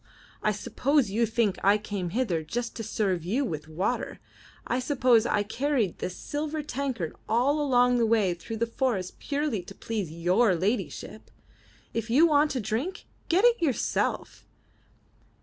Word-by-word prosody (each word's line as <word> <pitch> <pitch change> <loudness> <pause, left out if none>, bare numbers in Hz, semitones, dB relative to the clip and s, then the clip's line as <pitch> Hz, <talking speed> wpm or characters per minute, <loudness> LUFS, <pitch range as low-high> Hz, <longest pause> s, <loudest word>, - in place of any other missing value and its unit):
I 215 - +2
suppose 245 +3 +1
you 230 +3 +2
think 220 -3 0
I 200 +2 +5
came 205 -4 -4
hither 190 -5 0
just 235 +9 -4
to 225 - -5
serve 190 -5 -1
you 235 +11 0
with 155 - -5
water! 185 +10 -2 0.5
I 250 - 0
suppose 250 -3 +3
I 205 - +1
carried 240 - -1
this 180 - -4
silver 300 +1 -3
tankard 260 - -3
all 265 +7 +2
along 250 -3 +3
the 230 - +3
way 215 -5 +3
through 225 +6 -7
the 235 - +1
forest 230 -6 -2
purely 285 -8 -1
to 175 - -12
please 215 -7 -3
your 180 +5 +3
ladyship! 200 +8 -3 0.6
If 230 0 -3
you 280 +8 +6
want 300 -2 +3
a - - 0
drink, 240 - -3 0.2
get 370 +7 +4
it 480 -4 +4
yourself. 285 -7 -1
230 Hz, 155 wpm, -27 LUFS, 200-275 Hz, 0.6 s, you